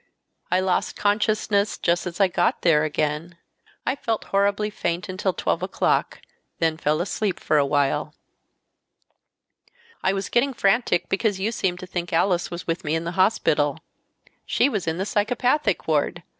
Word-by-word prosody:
I 185 +1 +2
lost. 185 -1 0
consciousness 210 0 +1
just 175 +1 0
as 175 +1 -7
I 195 - +5
got 175 -1 0
there 155 -3 +4
again. 155 +2 -2 0.5
I 260 - +1
felt 225 -5 -2
horribly 200 +1 +2
faint 175 -3 -2
until 190 +1 -1
12 - - -1
o'clock, - - 0 0.4
then 160 -1 +1
fell 155 0 0
asleep 195 +1 -2
for 155 - +2
awhile." 145 +2 +1 1.9
"I 190 - +2
was 195 0 -3
getting 260 +2 +1
frantic 195 -3 +2
because 200 0 0
you 210 +4 0
seemed 190 -5 -1
to - - -6
think 175 -1 -4
Alice 175 +1 +1
was 170 0 -6
with 165 +1 -2
me 150 +1 0
in 165 - -1
the 170 - -3
hospital. 160 -6 +2 0.7
She - - +3
was 205 -9 -3
in 160 0 -1
the 190 - -1
psychopathic 230 - 0
ward. 150 -3 0
185 Hz, 155 wpm, -24 LUFS, 165-205 Hz, 1.9 s, I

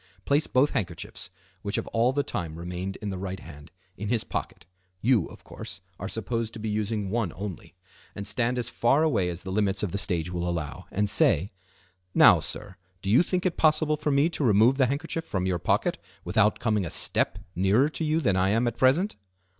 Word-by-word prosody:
Place 145 +2 +2
both 130 +3 +3
handkerchiefs, 90 -9 -3 0.3
which 100 0 -3
have - - -1
all 115 +2 +2
the 145 +1 0
time 85 - -4
remained 90 +3 -5
in 105 - -2
the 95 - -5
right 95 0 -4
hand, 75 -1 -12 0.3
in 105 +1 -4
his 115 -2 +1
pocket - - -5 0.3
(you, 115 -3 +3
of - - -14
course, 95 - -9 0.2
are 95 - -4
supposed 115 +1 -3
to 115 - -8
be 110 - -4
using 105 -1 -1
one 110 -6 0
only), 95 -2 -7 0.4
and 100 - -5
stand 120 +4 0
as 120 -2 -1
far 135 +8 +2
away 110 - +2
as 85 0 -6
the 95 - -5
limits 100 0 0
of 100 - -1
the 100 - -2
stage 90 -4 -2
will 90 0 -2
allow, 80 -4 -4
and 105 +2 0
say:—"Now, 90 -1 +2
sir, 100 -3 -6 0.3
do 95 - 0
you 120 - +7
think 180 +1 -1
it 180 - 0
possible 155 -1 +3
for 150 0 -2
me 140 +2 +4
to 165 - -3
remove 115 +4 +4
the 130 - +5
handkerchief 160 +4 -3
from 95 - -2
your 90 -2 0
pocket - - 0 0.3
without 105 0 +3
coming 105 -4 0
a 85 - -3
step 95 - +2 0.2
nearer 95 +9 +3
to 160 - -4
you 155 +1 +1
than 100 -10 +2
I 95 +1 +2
am 115 +4 +2
at 120 0 -2
present?" 145 - +3
105 Hz, 210 wpm, -27 LUFS, 95-125 Hz, 0.4 s, you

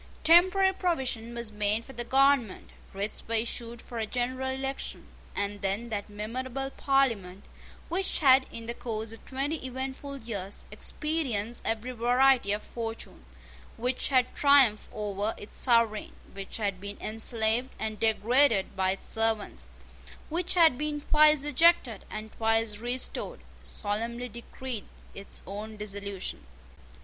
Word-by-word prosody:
Temporary 375 +3 +6
provision 260 - -1
was 235 -2 -4
made 210 +2 0
for 270 - -11
the 240 - -4
government: 270 -4 +2 0.2
writs 200 +2 -3
were 230 - 0
issued 235 +1 -3
for 235 - -6
a 220 - -1
general 255 +3 -2
election; 270 +1 -4 0.3
and 200 0 -2
then 200 +4 -1
that 210 -1 -4
memorable 255 +6 -4
Parliament, 230 -11 +1 0.4
which 375 +2 -1
had, 265 -3 +6
in 230 - -7
the 235 - -3
course 220 -2 -5
of 225 - -12
twenty 280 +3 -2
eventful 265 +2 -5
years, 205 -6 -6
experienced 255 -8 -2
every 225 +3 -1
variety 245 -1 +3
of 210 +1 -1
fortune, 225 - -6 0.5
which 250 +2 0
had 255 -2 +2
triumphed 275 -7 +5
over 210 0 -2
its 205 - -9
sovereign, 230 -4 +2 0.2
which 195 0 -6
had 200 -4 -2
been 200 0 -6
enslaved 225 +2 0
and 215 -1 -4
degraded 225 0 +3
by 190 0 +1
its 195 - -2
servants, 220 - -1 0.6
which 345 +3 +1
had 320 -7 +6
been 300 -1 -2
twice 300 -1 +5
ejected 295 - +3
and 215 0 -7
twice 225 -1 +2
restored, 245 +2 -2 0.2
solemnly 230 +4 -3
decreed 235 0 -6 0.3
its 200 - -6
own 210 +3 -7
dissolution. 200 -2 -5
235 Hz, 135 wpm, -29 LUFS, 215-265 Hz, 0.6 s, Temporary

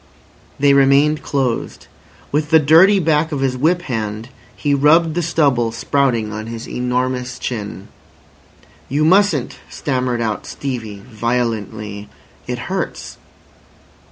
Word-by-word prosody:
They 140 0 +4
remained 140 +2 +4
closed. 130 -4 -2 0.5
With 150 +1 0
the 160 - +6
dirty 165 +7 +6
back 160 -2 +1
of 145 -3 -2
his 130 -1 0
whip 165 +7 +1
hand 110 -2 -4 0.3
he 145 -1 -1
rubbed 155 +4 +4
the 175 - -1
stubble 140 -8 +1
sprouting 115 -2 0
on 110 +1 -6
his 115 0 -7
enormous 125 0 -2
chin. 105 -5 -5 1.0
"You 150 +3 +1
mustn't," 180 -7 +2
stammered 125 -3 -2
out 110 -4 -3
Stevie 110 -7 -6
violently. 110 -3 -3 0.4
"It - - -3 0.2
hurts." - - -5
130 Hz, 120 wpm, -18 LUFS, 115-150 Hz, 1.0 s, the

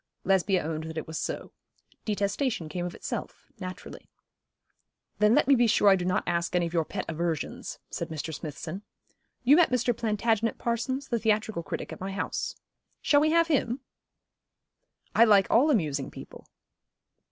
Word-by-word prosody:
Lesbia 190 0 +2
owned 155 0 -3
that 160 0 -7
it 160 - -3
was 160 0 -5
so. - - -4 0.5
Detestation 205 - -1
came 175 +2 -3
of 175 - -8
itself, - - -6
naturally. 185 -1 -8 1.1
'Then 210 +2 +5
let - - +3
me 280 - +6
be 240 -2 +4
sure 210 -2 +5
I 195 - +7
do 180 -2 -2
not 185 +3 +1
ask 170 0 -1
any 175 -1 +2
of 170 - -5
your 165 -2 +1
pet - - -4
aversions,' 165 -2 -3
said - - -4
Mr. 160 0 -5
Smithson. 155 +4 -6 0.6
'You 275 +5 +6
met 350 -4 +5
Mr. 250 -1 +1
Plantagenet 225 0 0
Parsons, 260 +4 -2
the 235 - 0
theatrical 215 -3 0
critic, - - -5
at - - -11
my 195 +1 -4
house. 195 - -3 0.4
Shall 290 -1 +4
we 310 - +3
have 335 +1 +4
him?' 275 -5 0 1.3
'I 230 - +7
like 205 -4 +6
all 260 +7 +5
amusing 150 - 0
people.' - - -12
205 Hz, 165 wpm, -28 LUFS, 170-235 Hz, 1.3 s, I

